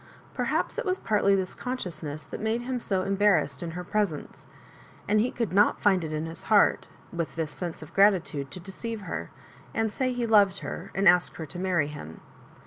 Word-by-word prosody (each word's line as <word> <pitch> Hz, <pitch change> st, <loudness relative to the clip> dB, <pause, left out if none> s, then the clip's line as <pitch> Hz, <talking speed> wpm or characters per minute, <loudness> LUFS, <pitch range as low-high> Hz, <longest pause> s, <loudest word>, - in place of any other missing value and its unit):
Perhaps -, -, -1 dB
it -, -, -1 dB
was 370 Hz, -1 st, 0 dB
partly 205 Hz, -2 st, +3 dB
this 190 Hz, -2 st, -1 dB
consciousness 165 Hz, -, -5 dB
that -, -, -7 dB
made 220 Hz, +2 st, -1 dB
him 255 Hz, +1 st, -2 dB
80 190 Hz, -5 st, -1 dB
embarrassed 195 Hz, -8 st, +2 dB
in 170 Hz, -, -4 dB
her 180 Hz, -, -4 dB
presence; 190 Hz, -5 st, -2 dB, 0.6 s
and 210 Hz, +1 st, +3 dB
he 235 Hz, +4 st, +2 dB
could 230 Hz, -9 st, -3 dB
not 205 Hz, +2 st, +4 dB
find 190 Hz, -4 st, +3 dB
it 155 Hz, -, -4 dB
in 155 Hz, +1 st, -2 dB
his 165 Hz, 0 st, -8 dB
heart, 210 Hz, -2 st, +3 dB, 0.3 s
with 170 Hz, -2 st, -3 dB
this 160 Hz, -2 st, -2 dB
sense 170 Hz, -1 st, -5 dB
of 155 Hz, +2 st, -13 dB
grati 195 Hz, -3 st, +5 dB
tude, 140 Hz, -4 st, -5 dB
to 180 Hz, -, -8 dB
deceive 210 Hz, +5 st, -6 dB
her, -, -, -5 dB, 0.5 s
and 220 Hz, -1 st, 0 dB
say 255 Hz, -1 st, 0 dB
he 245 Hz, -1 st, -1 dB
loved 205 Hz, -4 st, +4 dB
her, -, -, -6 dB
and 195 Hz, +1 st, +3 dB
ask 180 Hz, 0 st, +5 dB
her 160 Hz, -, -5 dB
to 175 Hz, +3 st, -6 dB
marry 180 Hz, -5 st, +1 dB
him. 80 Hz, -, -9 dB
190 Hz, 205 wpm, -27 LUFS, 165-215 Hz, 0.6 s, grati